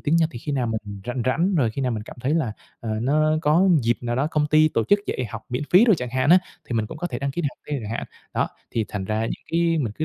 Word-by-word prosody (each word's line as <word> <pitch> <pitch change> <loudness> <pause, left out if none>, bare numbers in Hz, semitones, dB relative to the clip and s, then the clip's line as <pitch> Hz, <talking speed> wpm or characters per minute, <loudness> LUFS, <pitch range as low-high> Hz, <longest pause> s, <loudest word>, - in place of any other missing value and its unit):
tiếng 155 +2 +2
Nhật 160 -1 +3
thì 120 - -6
khi 145 - -4
nào 130 -3 0
mình 105 -3 -4
rảnh 125 0 -2
rảnh, 170 +9 +2
rồi 125 -9 +2
khi 135 - -4
nào 125 -2 0
mình 110 - -3
cảm - - -11
thấy 140 +6 0
là, 135 -10 0 0.3
à, 115 - -4
nó 155 +4 +3
có 165 +6 +4
dịp 120 +1 +1
nào 120 -1 -2
đó 135 +3 +1
công 150 -2 +1
ty 155 +1 +5
tổ 115 -7 0
chức 205 - +4
dạy 130 - -2
học 115 0 -6
miễn 125 +4 -2
phí 190 +6 +7
đồ 220 - +6
chẳng 125 -4 -4
hạn 130 +4 +1
á, 180 - +9 0.3
thì - - -4
mình 110 -2 0
cũng 150 - -9
có 175 - -2
thể - - -4
đăng 140 0 -2
ký 175 +5 -3
để 145 - +1
học - - -20
thêm 145 -3 -2
chẳng 105 - -6
hạn. - - -3 0.3
Đó, - - +1 0.2
thì 115 -2 0
thành 100 -2 -4
ra 110 +3 -1
những 115 - -4
cái 165 -1 +2
mình 115 -7 -1
cứ 155 - 0
135 Hz, 315 wpm, -24 LUFS, 115-155 Hz, 0.3 s, á